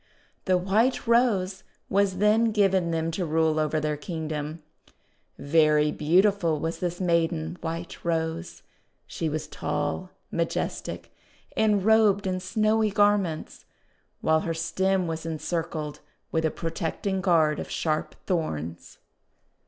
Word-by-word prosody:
The 185 -2 +3
White 210 +8 +1
Rose 210 -6 +2 0.2
was 195 -1 +1
then 210 +3 +4
given 195 -5 +2
them 165 0 -1
to 180 +3 -2
rule 160 -1 +1
over 155 0 +1
their 150 -1 -1
Kingdom. 155 -1 -5 0.7
Very 150 0 +3
beautiful 170 +1 +2
was 165 +2 -3
this 175 -1 -3
maiden 165 - 0
White 165 +1 -5
Rose. 165 0 -2 0.4
She 165 - -3
was 155 0 -3
tall, 80 - -3 0.2
majestic, - - -3 0.4
and 210 -3 +2
robed 215 -3 +4
in 185 -1 -1
snowy 215 +3 +1
garments, 205 -5 +1 0.6
while 160 0 +3
her 165 +1 -3
stem 185 +3 0
was 160 -1 -4
encircled 160 -1 -3 0.3
with 160 -1 +1
a - - +3
protecting 175 +4 -3
guard 160 -5 +3
of - - -6
sharp 155 -1 -1
thorns. 85 - -3
170 Hz, 120 wpm, -26 LUFS, 160-195 Hz, 0.7 s, then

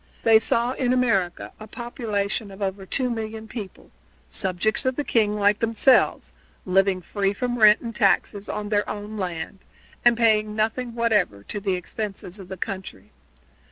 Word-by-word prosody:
They 225 -1 +7
saw 235 +2 0
in 255 -1 0
America 200 -9 0
a 215 - -9
population 215 -3 -3
of 195 0 -12
over 195 -1 -3
two 255 +3 0
million 220 -1 -5
people, 215 -4 -9 0.4
subjects 190 +5 0
of 260 -1 0
the 290 - -1
king, 215 -6 +1
like 205 0 +3
themselves, 230 +3 +3 0.3
living 190 0 +2
free 200 +2 -1
from 245 +3 -2
rent 215 0 +7
and 230 -1 -6
taxes 200 -1 +1
on 210 -1 -4
their 205 -1 +1
own 210 +1 -6
land 180 -2 -4 0.4
and 240 -1 +5
paying 215 -2 +2
nothing 230 +2 -1
whatever 220 - +1
to 205 - -4
the 195 -2 0
expenses 195 +1 -6
of 190 - -10
the 190 - -7
country. 185 - -6
210 Hz, 160 wpm, -24 LUFS, 195-230 Hz, 0.4 s, They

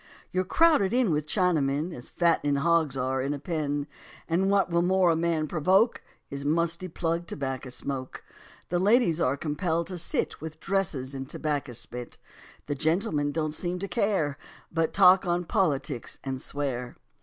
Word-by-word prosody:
You're 185 0 0
crowded 290 - +4
in 250 -7 +3
with 150 0 -1
Chinamen, 160 -3 +1
As 125 - -8
fattening 165 -4 +2
hogs 155 -2 +2
are 130 +1 0
in 140 +2 -1
a - - -7
pen; 145 -2 -2 0.4
And 185 +4 +1
what 195 -2 +2
will 170 0 +3
more 185 0 +3
a - - +2
man 165 -1 0
provoke 185 +9 +2 0.3
Is 140 0 -4
musty 170 +4 0
plug 170 0 -2
tobacco 135 -2 -4
smoke. 130 0 -5 0.5
The 175 - +1
ladies 190 -4 +3
are 135 +2 +2
compelled 160 +3 -1
to 180 0 -5
sit 165 - -1
With 155 0 -7
dresses 160 -9 -1
in 135 -1 -5
tobacco 145 -3 -3
spit; 120 +1 -5 0.5
The 145 - -2
gentlemen 160 0 0
don't 155 0 -2
seem 175 +2 -2
to 200 +2 -4
care, 195 - 0 0.3
But 165 -1 0
talk 185 -1 +6
on 175 0 0
politics 145 - -1
and 130 -1 -4
swear. 130 -4 -3
160 Hz, 165 wpm, -27 LUFS, 140-180 Hz, 0.5 s, talk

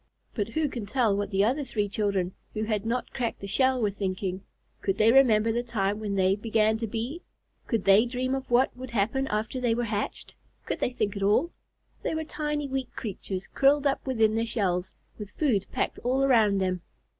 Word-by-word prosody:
But 205 -3 -1
who 305 +7 0
can 235 -6 -5
tell 230 -3 +2
what 205 0 -2
the 195 -1 +2
other 265 +7 +1
three 215 -5 -1
children, 195 -3 -1 0.2
who 215 - -1
had 215 -1 -1
not 245 +2 -2
cracked 240 -3 -2
the - - -7
shell, 260 +6 +2
were 210 -3 +1
thinking? 190 -1 -3 0.4
Could 195 0 0
they 220 +1 +5
remember 230 -4 +5
the 235 +2 0
time 210 -4 -1
when 205 -2 -3
they 190 0 +3
began 220 0 +2
to 225 0 -3
be? 235 - -4 0.5
Could 225 -6 -1
they 200 +4 +6
dream 255 +2 -2
of 270 0 -3
what 245 +2 +3
would 255 +1 -8
happen 235 +5 0
after 220 +4 -2
they 235 -2 +2
were 240 - -1
hatched? 210 -2 -3 0.3
Could - - -3
they - - +1
think 215 -5 -2
at 200 - -4
all? 215 - +3 0.5
They - - -2
were 315 - -2
tiny, 300 -2 -3
weak 265 -1 -3
creatures, 195 -3 -5
curled 280 +1 +3
up 275 -1 +1
within 225 -4 +3
their 225 +1 +1
shells, 190 -5 -1 0.3
with 210 -2 -6
food 230 - +1
packed - - -2
all 260 +3 +1
around 225 -7 +4
them. 185 -2 -1
225 Hz, 205 wpm, -27 LUFS, 200-255 Hz, 0.5 s, they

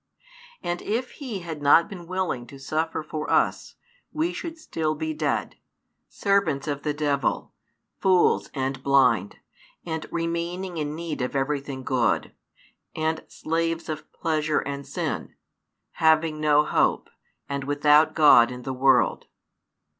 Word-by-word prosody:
And 175 0 -2
if 240 +4 -2
He 240 -10 -6
had 160 -3 -6
not 145 +4 +5
been 175 -4 -9
willing 180 -10 -2
to 140 - -11
suffer 155 +4 -2
for 155 0 -5
us, - - +1 0.4
we 320 +3 -1
should 335 -2 -5
be - - -22
still 160 - -2
dead, 155 -1 -2 0.5
servants 185 -8 0
of 145 -1 -2
the 150 - -1
devil, 145 -2 -1 0.5
fools 185 -2 +3
and 135 0 -2
blind, 135 -8 +3 0.5
and 160 -2 -4
remaining 170 +2 -3
in 150 -1 -3
need 165 -4 -4
of 125 +2 -3
everything 140 -1 -2
good, 125 -2 0 0.6
and 160 0 -1
slaves 165 +1 -2
of 155 -1 -6
pleasure 155 -2 0
and 140 0 -6
sin; - - -4 0.6
having 160 -1 +2
no 150 0 +4
hope, - - +1 0.4
and 140 -1 -3
without 150 +2 +4
God 145 -7 +7
in 125 0 -8
the 130 - -3
world. 130 0 +3
155 Hz, 135 wpm, -25 LUFS, 140-165 Hz, 0.6 s, God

